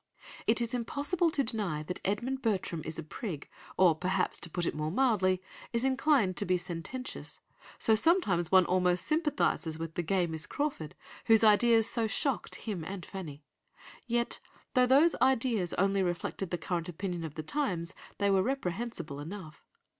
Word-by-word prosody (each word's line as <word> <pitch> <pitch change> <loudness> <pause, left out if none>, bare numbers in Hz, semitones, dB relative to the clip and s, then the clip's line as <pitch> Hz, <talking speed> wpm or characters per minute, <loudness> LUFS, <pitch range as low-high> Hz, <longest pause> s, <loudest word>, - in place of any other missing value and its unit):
It 230 +2 +3
is 235 +1 -2
impossible 285 +8 0
to 285 -3 +1
deny 200 - -2
that 180 +4 -5
Edmund 240 +7 -1
Bertram 190 -8 -1
is 160 +1 -5
a 165 - -4
prig, 155 -1 -6 0.3
or 180 -3 +6
perhaps, 180 +4 0
to 170 - -3
put 175 +1 -2
it - - 0
more 155 0 -2
mildly, 185 -4 +2 0.3
is 235 +2 +1
inclined 265 - +2
to - - +1
be 180 0 +3
sententious, 180 +9 -6 0.4
so 220 - +3
sometimes 215 - +3
one 185 -1 +7
almost 180 0 +2
sympathises 295 - 0
with 165 0 -5
the 175 - -1
gay 180 +1 +1
Miss 160 -1 -5
Crawford, 280 - -3 0.3
whose 225 -1 +6
ideas 225 +1 +5
so 230 -1 0
shocked 265 +3 0
him 200 -7 -4
and 185 +1 -6
Fanny; 155 -7 -8 0.6
yet 235 0 0 0.3
though 250 -1 +4
those 290 +6 +5
ideas 235 -8 +2
only 195 +1 +2
reflected 175 +1 -2
the 175 - -1
current 170 0 -3
opinion 175 0 -4
of 160 -2 -6
the 155 - -4
times, 180 - -2 0.2
they 200 -1 +2
were 190 -1 +4
reprehensible 190 - -3
enough. 160 0 -8
195 Hz, 170 wpm, -31 LUFS, 170-240 Hz, 0.6 s, one